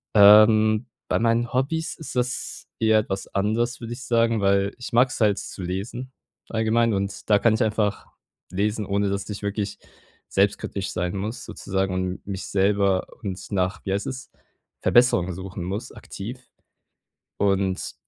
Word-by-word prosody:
Ähm. 110 +2 +7 0.2
Bei - - +2
meinen 115 +1 +1
Hobbys 160 +6 -1
ist 160 - -8
das 125 -1 -2
eher 110 -1 +4
etwas 95 -2 -3
anders, 115 +5 0
würde 115 0 -6
ich 130 +1 -8
sagen, 115 -2 +2
weil 100 0 +2
ich 125 - -7
mag's 125 +2 +3
halt 105 -2 +4
zu 95 - -7
lesen 105 +8 -4 0.4
allgemein 115 +1 +2
und 100 +1 -3
da 105 - +6
kann 115 +1 +3
ich 110 - 0
einfach 105 -2 0 0.4
lesen, 105 +3 -1
ohne 100 0 +1
dass 100 +1 -3
ich 105 0 -6
wirklich 100 0 -2 0.5
selbstkritisch 100 0 0
sein 90 +1 -2
muss 110 +6 -4
sozusagen 95 -1 -2
und 95 0 -3
mich 95 -1 -5
selber 100 -1 +2
und 95 -3 -4
nach, 95 +1 0
wie 95 - 0
heißt 100 - -2
es, 130 0 -6 0.5
Verbesserungen 105 -7 +4
suchen 95 +1 -6
muss 100 +5 -4
aktiv. 115 +6 -8 1.0
Und 95 -2 0
105 Hz, 155 wpm, -24 LUFS, 95-115 Hz, 1.0 s, Ähm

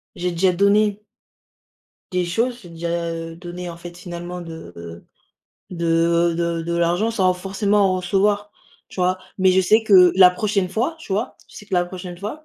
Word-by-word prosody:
j'ai 180 -1 -2
déjà 180 +2 +2
donné 205 +2 +2 1.1
des 180 - +1
choses, 230 +8 -1
j'ai 175 - -13
déjà, 170 0 -3
heu, 165 0 -6
donné, 175 0 -7
en 170 - -7
fait, 175 0 -11
finalement 175 -1 -7
de 160 - -9
heu, 85 0 -10 0.7
de 170 0 +1
de 170 -1 -1
de 170 +1 -2
l'argent 175 +6 +1
sans 190 -5 +2
forcément 195 +1 +1
en - - 0
recevoir, 205 +3 0 0.4
tu - - -14
vois? 185 +1 +1 0.2
Mais 185 0 +4
je 190 - +4
sais 215 +4 +3
que 185 -4 +7
la 185 -1 +8
prochaine 200 0 -1
fois, 245 - -2
tu 270 -11 -7
vois? 215 +6 -2
Je - - -18
sais - - -10
que 200 -2 -4
la 175 - +3
prochaine 180 -1 -8
fois, 220 - -7
180 Hz, 190 wpm, -21 LUFS, 170-200 Hz, 1.1 s, la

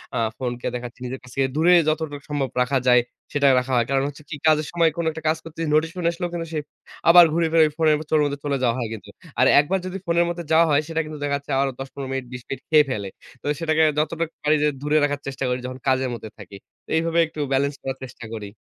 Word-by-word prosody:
আ - - 0 0.2
ফোনকে 125 -1 -4
দেখাচ্ছি 120 0 -7
নিজের 130 +1 -5
কাছ 130 - -14
থেকে 135 -1 +2
দূরে 170 +3 +5
যতটা 155 -2 -1
সম্ভব 145 -3 -1
রাখা 130 +2 +1
যায় 125 -1 +6 0.3
সেটা 140 -1 +3
রাখা 130 +1 -4
হয়। 120 -1 +3
কারণ 135 0 +2
হচ্ছে 145 +1 -9
কি 165 - -4
কাজের 155 -1 +3
সময় 170 -1 +3
কোন 170 - -1
একটা 160 0 -9
কাজ 155 +1 +2
করতেছি। 165 0 -5
নোটিফিকেশন 165 +3 0
আসলেও 175 +1 -4
কিন্তু 165 -1 -4
সে 155 - 0 0.5
আবার 175 +1 +10
ঘুরে 165 0 +2
ফিরে 160 -1 +6
ফোনের 160 -2 +4
মধ্যে 150 -2 0
চলে 140 -1 0
যাওয়া 120 -2 +2
হয় 120 - -2
কিন্তু। 110 - -10 0.3
আর - - +6
একবার 180 +7 +1
যদি 185 +1 -4
ফোনের 170 0 +2
মধ্যে 170 0 -4
যাওয়া 165 +1 +6
হয় 145 0 +3
সেটা 165 0 -1
কিন্তু 155 0 -7
দেখা 145 -1 0
যাচ্ছে 140 0 -9
আরো 135 -1 0
১০ 135 - -5
১৫ 135 -2 -6
মিনিট 135 -1 -3
২০ 125 - -6
মিনিট 135 - -5
খেয়ে 155 -2 +6
ফেলে। 105 -6 -3 0.3
তো - - -17
সেটাকে 160 -1 +2
যতটুক 165 +1 -1
পারি 150 +1 +4
যে - - +4
দূরে 150 +1 +1
রাখার 145 -1 0
চেষ্টা 135 0 -4
করি 125 0 -1
যখন 130 0 -6
কাজের 130 0 +2
মধ্যে 110 -2 -7
থাকি। 100 -1 -11 0.3
তো - - -22
এইভাবে 165 +1 +1
একটু 160 0 -11
বেলেন্স 140 +1 +1
করার 135 0 -4
চেষ্টা 125 -2 -9
করি। 105 -2 -7
145 Hz, 240 wpm, -23 LUFS, 130-160 Hz, 0.5 s, আবার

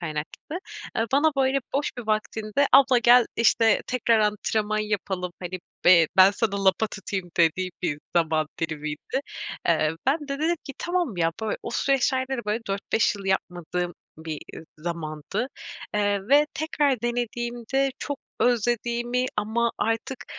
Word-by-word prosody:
kaynaklı. 160 - -5 0.4
Eee, 225 - +2
bana, 300 +3 +4
böyle, 270 0 +3 0.2
boş 285 +1 +1
bir 230 - -6
vaktinde, 215 +4 0
abla 265 -2 +7
gel, 240 0 +6
işte, 225 -1 +4
tekrar 235 -2 +2
antrenman 215 0 0
yapalım, 195 -4 -2
hani, 185 +1 -4 0.3
be 170 -3 +7
ben 190 +1 +8
sana 200 -2 -1
lapa 195 +3 +3
tutayım 195 -3 -5
dediği 175 +2 +2
bir 150 -4 -1 0.2
zaman 160 -2 +2
dilimiydi, 155 - -3 0.5
eee. 155 -2 +3
Ben 285 +5 +3
de 275 - -3
dedim 330 +3 +1
ki, 275 - -7
tamam, 345 - -1
ya, 165 -1 +1
böyle, 215 - -1
o - - -5
süreçlerde 265 +1 +1
de, - - -2
böyle, 215 +3 0
4-5 200 +2 +1
yıl 200 -1 -9
yapmadığım 180 -2 -2 0.3
bir, 160 0 -5
iii, 155 +1 -9
zamandı, 170 +6 -4 0.5
eee, 205 -1 +1
ve 290 +2 +6
tekrar 290 -5 0
denediğimde 240 +2 -1
çok 285 -2 -4 0.2
özlediğimi 240 +1 +1
ama 225 +3 +1
artık 225 +4 -2
215 Hz, 145 wpm, -25 LUFS, 180-250 Hz, 0.5 s, ben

